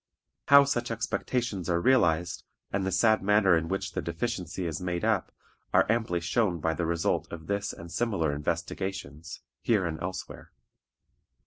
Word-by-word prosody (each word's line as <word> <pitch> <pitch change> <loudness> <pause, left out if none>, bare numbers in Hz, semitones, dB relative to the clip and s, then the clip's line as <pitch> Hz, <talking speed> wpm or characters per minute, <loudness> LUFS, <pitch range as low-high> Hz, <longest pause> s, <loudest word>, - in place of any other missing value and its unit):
How 140 0 +9
such 120 -4 -1
expectations 115 -3 -2
are 85 -1 +2
realized, 85 -7 +2 0.3
and 95 -1 0
the - - 0
sad 110 +4 +3
manner 100 -2 +4
in 80 0 0
which 95 +3 -2
the - - -3
deficiency 90 0 -3
is 80 -1 -3
made 90 -1 -2
up, - - +1 0.4
are - - +6
amply 110 -7 0
shown 85 +1 0
by 80 +1 0
the 80 +1 -2
result 85 0 0
of 80 -2 -8
this 100 +3 -2
and 85 0 -10
similar 90 -6 0
investigations, 80 +1 -4 0.2
here 105 -6 +2
and 80 -2 -4
elsewhere. 90 +1 -6
90 Hz, 155 wpm, -28 LUFS, 85-110 Hz, 0.4 s, How